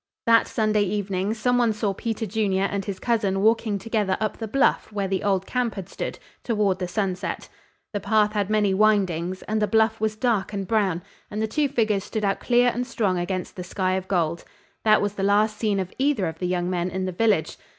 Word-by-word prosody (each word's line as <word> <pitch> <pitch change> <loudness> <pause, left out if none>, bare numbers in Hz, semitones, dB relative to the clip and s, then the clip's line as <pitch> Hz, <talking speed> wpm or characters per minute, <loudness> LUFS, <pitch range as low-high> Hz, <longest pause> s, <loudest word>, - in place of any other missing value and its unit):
That 230 0 +5
Sunday 215 -1 +1
evening 200 0 -1
some 245 +2 +1
one 235 -2 +3
saw 210 -2 -1
Peter 225 +2 -3
Junior 200 -2 0
and 200 0 -1
his 195 -2 -4
cousin 205 -4 0
walking 220 -1 +2
together 205 -2 -1
up 215 -1 -2
the 225 - -5
bluff 260 0 +1
where 200 -2 -2
the 190 0 -1
old 195 -2 +1
camp 250 0 -1
had 195 -3 -6
stood, - - -5 0.3
toward 210 -5 +1
the 180 - -2
sunset. 190 0 -3 0.4
The 205 - -1
path 215 0 +2
had 205 -2 0
many 210 -2 +2
windings, 190 -4 +1
and 215 0 -1
the 210 - +2
bluff 220 +1 +2
was 215 -1 0
dark 215 -4 0
and 195 -2 -3
brown, 190 -6 +1 0.3
and 210 - -4
the 220 - +1
two 290 +5 0
figures 220 -7 +1
stood 215 0 -3
out 195 -1 0
clear 245 0 +3
and 245 +1 -3
strong 200 -7 0
against 180 0 -3
the 180 - -5
sky 185 +1 -1
of 190 0 -2
gold. 170 -3 0 0.4
That 215 -2 +4
was 205 -1 -1
the 200 - -5
last 210 +2 +3
seen 210 -3 0
of 185 -1 -4
either 270 -8 +2
of 160 -1 -5
the 180 - -1
young 175 -1 -1
men 180 0 -1
in 185 +1 -3
the 185 - -2
village. 205 -3 +1
205 Hz, 220 wpm, -24 LUFS, 190-220 Hz, 0.4 s, That